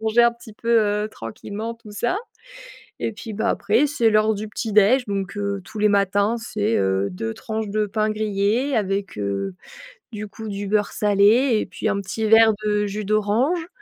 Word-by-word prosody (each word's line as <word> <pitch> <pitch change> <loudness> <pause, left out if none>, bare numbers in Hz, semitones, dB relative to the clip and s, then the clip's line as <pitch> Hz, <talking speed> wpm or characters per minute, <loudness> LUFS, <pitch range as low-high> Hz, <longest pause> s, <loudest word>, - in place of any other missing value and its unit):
manger 220 +2 +3
un 235 0 +5
petit 235 -2 -14
peu 215 -2 +1
tranquillement 205 - -6
tout 230 -2 -15
ça 240 - -1 0.8
et - - -2
puis, 220 +1 -8
bah, 220 +3 -1
après, 215 +8 +2
c'est 235 -6 +2
l'heure 215 0 +3
du 215 +1 -5
petit 215 -1 -4
déj 220 +5 +5
donc 200 0 -3
heu, 200 -1 -2
tous 215 +3 -9
les 210 - +4
matins, 200 +2 +2
c'est, 220 -1 -1
heu, 95 +1 +1
2 110 +5 -4
tranches 220 - -4
de 210 +1 0
pain 215 +1 -1
grillé 215 +5 0
avec 195 - -1
heu, 100 -2 -2 0.6
du 215 -1 -6
coup, 220 +2 -8
du 200 0 -4
beurre 205 0 +1
salé 215 +4 +3
et - - -2
puis 220 - -3
un 200 -1 0
petit 220 +3 -3
verre 225 0 +6
de 210 0 +1
jus 210 +1 -4
d'orange 220 - +1
215 Hz, 185 wpm, -22 LUFS, 200-225 Hz, 0.8 s, verre